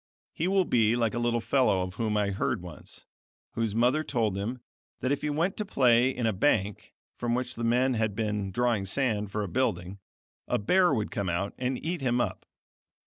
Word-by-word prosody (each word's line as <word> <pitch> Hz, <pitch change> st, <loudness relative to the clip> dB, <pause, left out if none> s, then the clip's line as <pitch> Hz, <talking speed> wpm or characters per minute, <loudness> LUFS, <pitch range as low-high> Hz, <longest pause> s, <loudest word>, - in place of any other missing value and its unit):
He 165 Hz, -, -1 dB
will 190 Hz, -1 st, +3 dB
be 115 Hz, -4 st, +3 dB
like 115 Hz, -2 st, 0 dB
a 120 Hz, -, -2 dB
little 120 Hz, 0 st, +1 dB
fellow 125 Hz, -7 st, +2 dB
of 90 Hz, 0 st, -6 dB
whom 105 Hz, 0 st, -1 dB
I 100 Hz, -1 st, +1 dB
heard 100 Hz, +1 st, -1 dB
once, 85 Hz, -3 st, -10 dB, 0.5 s
whose 115 Hz, -3 st, -2 dB
mother 125 Hz, +7 st, +3 dB
told 115 Hz, -9 st, 0 dB
him 115 Hz, +6 st, -4 dB, 0.4 s
that 130 Hz, -, -1 dB
if 145 Hz, -, 0 dB
he -, -, -2 dB
vent 165 Hz, +6 st, 0 dB
to 210 Hz, -, -1 dB
play 125 Hz, -6 st, +4 dB
in 125 Hz, -3 st, -2 dB
a 110 Hz, -, +2 dB
bank 105 Hz, -2 st, 0 dB, 0.2 s
from 120 Hz, 0 st, -1 dB
which 125 Hz, 0 st, -2 dB
the 115 Hz, -, -6 dB
men 125 Hz, +3 st, +2 dB
had 110 Hz, -3 st, -1 dB
been 105 Hz, -2 st, -2 dB
drawing 115 Hz, -1 st, 0 dB
sand 105 Hz, -3 st, 0 dB
for 105 Hz, 0 st, -2 dB
a -, -, -3 dB
building, 100 Hz, -4 st, -1 dB, 0.5 s
a -, -, +1 dB
bear 180 Hz, -, +3 dB
would 110 Hz, -6 st, -1 dB
come 100 Hz, -4 st, -2 dB
out 90 Hz, +4 st, -2 dB
and 130 Hz, 0 st, -1 dB
eat 170 Hz, -1 st, -2 dB
him 125 Hz, -2 st, +1 dB
up. -, -, -2 dB
115 Hz, 205 wpm, -28 LUFS, 105-130 Hz, 0.5 s, play